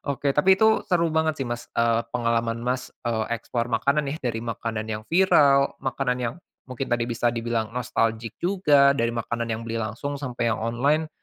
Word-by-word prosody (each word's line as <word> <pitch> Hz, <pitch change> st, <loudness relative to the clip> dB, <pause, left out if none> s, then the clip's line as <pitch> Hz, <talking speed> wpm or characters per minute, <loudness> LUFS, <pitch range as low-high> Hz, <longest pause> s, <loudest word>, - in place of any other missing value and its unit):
Oke, 140 Hz, 0 st, -1 dB
tapi 190 Hz, +6 st, +6 dB
itu 220 Hz, 0 st, +4 dB
seru 170 Hz, -4 st, +2 dB
banget 160 Hz, -2 st, 0 dB
sih, 130 Hz, -, -1 dB
Mas, 120 Hz, 0 st, -4 dB
eee, 115 Hz, 0 st, +2 dB
pengalaman 115 Hz, -1 st, 0 dB
Mas, 125 Hz, +1 st, -3 dB, 0.2 s
eee, 110 Hz, -2 st, 0 dB
explore 115 Hz, +1 st, -2 dB
makanan 140 Hz, +6 st, +2 dB
ya, -, -, -4 dB
dari 115 Hz, -3 st, -2 dB
makanan 115 Hz, -1 st, -3 dB
yang 105 Hz, -, -4 dB
viral, 145 Hz, -6 st, +4 dB
makanan 130 Hz, -1 st, -1 dB
yang 120 Hz, +2 st, -2 dB, 0.3 s
mungkin 130 Hz, +1 st, -4 dB
tadi 120 Hz, -1 st, +1 dB
bisa 120 Hz, 0 st, 0 dB
dibilang 115 Hz, -1 st, -2 dB
nostalgic 115 Hz, -2 st, -1 dB
juga, 150 Hz, -7 st, +4 dB
dari 115 Hz, -4 st, 0 dB
makanan 115 Hz, 0 st, -3 dB
yang 110 Hz, 0 st, -2 dB
beli 115 Hz, 0 st, -3 dB
langsung 135 Hz, +7 st, -4 dB
sampai 120 Hz, -4 st, -1 dB
yang 110 Hz, -, -4 dB
online. 140 Hz, +8 st, +1 dB
120 Hz, 180 wpm, -24 LUFS, 115-140 Hz, 0.3 s, tapi